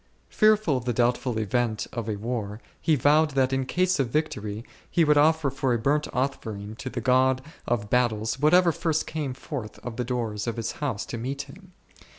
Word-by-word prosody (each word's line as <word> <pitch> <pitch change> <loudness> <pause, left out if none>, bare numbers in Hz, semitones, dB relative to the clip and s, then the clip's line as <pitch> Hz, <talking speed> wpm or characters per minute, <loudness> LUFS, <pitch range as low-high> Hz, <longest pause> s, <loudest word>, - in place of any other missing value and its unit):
Fearful 215 -9 +3
of 125 - -6
the 120 - 0
doubtful 120 0 +1
event 110 +1 0
of 115 -2 -4
a 105 - -1
war, 105 -1 -4 0.2
he 160 - +3
vowed 150 +2 +3
that 135 -1 +2
in 135 -1 0
case 185 +1 +1
of 130 -4 +1
victory 110 -7 -2 0.2
he 170 - +3
would 150 -1 +4
offer 155 -1 +3
for 130 -2 0
a - - +1
burnt 145 +6 +1
offering 110 -5 -3
to 130 - -5
the 125 -1 -4
God 130 +1 +3 0.3
of 105 -4 -1
battles 115 -1 +1
whatever 170 +4 +5
first 160 -1 -1
came 145 -5 -4
forth 130 -4 -6
of 120 -2 -5
the 125 - 0
doors 115 -3 -3
of 115 - -2
his 115 0 -2
house 130 -8 -2
to 115 - -6
meet 135 +4 -3
him. 185 +7 -15
130 Hz, 195 wpm, -26 LUFS, 115-150 Hz, 0.3 s, whatever